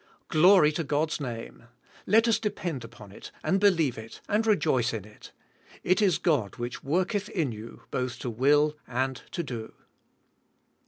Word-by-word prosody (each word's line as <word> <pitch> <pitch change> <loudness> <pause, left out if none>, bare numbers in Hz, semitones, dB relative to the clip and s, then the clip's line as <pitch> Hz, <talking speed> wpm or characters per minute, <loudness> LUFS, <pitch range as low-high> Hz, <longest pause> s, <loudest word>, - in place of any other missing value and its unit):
Glory 175 -1 +6
to 160 +2 -2
God's 150 +2 -1
name. 120 -2 -7 0.4
Let 225 +4 +5
us 230 - +3
depend 180 - -3
upon 115 -3 -12
it - - -11
and 195 - +2
believe 165 - +2
it 110 0 -10
and 220 +2 +1
re 215 - +5
joice 130 - +1
in 105 -3 -6
it. 105 0 -15 0.5
*'It 185 +4 +2
is 190 -5 +3
God 140 - 0
which 120 +1 -6
worketh 185 +7 0
in 155 -9 -1
you 110 +1 -10
both 125 -1 -2
to 125 - -4
will 145 +6 +3
and 130 +1 -1
to 170 - -3
do." 115 -6 -6
145 Hz, 165 wpm, -27 LUFS, 120-185 Hz, 0.5 s, Glory